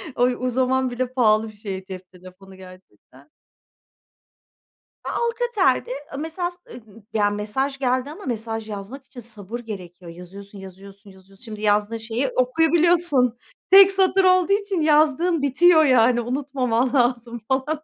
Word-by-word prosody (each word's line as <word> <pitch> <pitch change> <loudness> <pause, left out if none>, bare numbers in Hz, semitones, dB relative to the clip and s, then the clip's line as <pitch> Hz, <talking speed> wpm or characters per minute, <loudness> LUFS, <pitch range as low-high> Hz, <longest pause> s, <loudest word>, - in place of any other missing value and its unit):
O, 245 - +1
o, 250 0 0
zaman 260 +1 0
bile 250 +1 -4
pahalı 220 -3 +2
bir 215 - -12
şey 195 -2 -7
cep 185 -1 -10
telefonu 185 +1 -15
gerçekten. 185 - -17 1.8
Ya - - -2
Alcatel'di. 465 - 0 0.3
Mesaj, 350 +3 -4
eee, 245 - -11 0.3
ya 205 -2 +2
mesaj 215 +7 -3
geldi 255 0 -1
ama 325 +7 -11
mesaj 225 -3 -5
yazmak 210 +7 -8
için 260 -1 -13
sabır 220 -1 -8
gerekiyor. 180 -6 -10
Yazıyorsun, 195 +4 -12
yazıyorsun, 195 +2 -14
yazıyorsun. 190 +2 -19
Şimdi 215 -3 -9
yazdığın 210 +1 +1
şeyi 225 +4 -3
okuyabiliyorsun. 320 -1 +2 0.3
Tek 390 0 +8
satır 385 0 +2
olduğu 370 +1 +3
için 400 -4 -1
yazdığın 310 +2 +2
bitiyor 315 +4 +4
yani. 245 -2 +3
Unutmaman 255 -1 -2
lazım 240 -2 0
falan. 290 +4 -2
245 Hz, 135 wpm, -22 LUFS, 205-295 Hz, 1.8 s, Tek